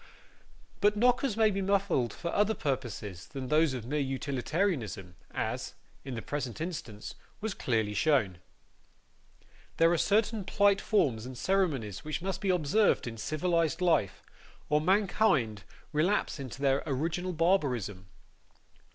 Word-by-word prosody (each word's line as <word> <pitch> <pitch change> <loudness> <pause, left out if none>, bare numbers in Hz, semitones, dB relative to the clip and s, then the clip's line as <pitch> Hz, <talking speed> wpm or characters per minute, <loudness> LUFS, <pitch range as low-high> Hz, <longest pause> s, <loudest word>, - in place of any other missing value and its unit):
But 210 +1 +3
knockers 245 0 +2
may 220 -1 +4
be 195 0 -2
muffled 190 - +1
for 170 +8 -5
other 210 +2 +2
purposes 120 - -4
than 135 -3 -6
those 155 -2 +3
of 120 -3 -6
mere 150 +5 -1
utilitarianism, 135 - -2
as, - - -3 0.3
in 130 -2 -5
the 115 - -5
present 145 -2 -4
instance, 155 - -5 0.3
was 220 -1 -3
clearly 110 - 0
shown. 105 - +2 1.4
There 165 +1 +5
are 170 - +1
certain 215 +2 +2
polite 200 +1 +3
forms 130 - +1
and 130 -1 -8
ceremonies 140 - 0
which 155 -1 -3
must 190 0 -3
be 200 - -1
observed 180 +4 +2
in 115 -2 -6
civilised 165 +5 0
life, 170 - +1 0.5
or 150 0 +3
mankind 180 - +2 0.3
relapse 160 +1 +1
into 135 +1 -7
their 135 0 +3
original 165 +6 -1
barbarism. 130 - 0
155 Hz, 135 wpm, -30 LUFS, 125-195 Hz, 1.4 s, There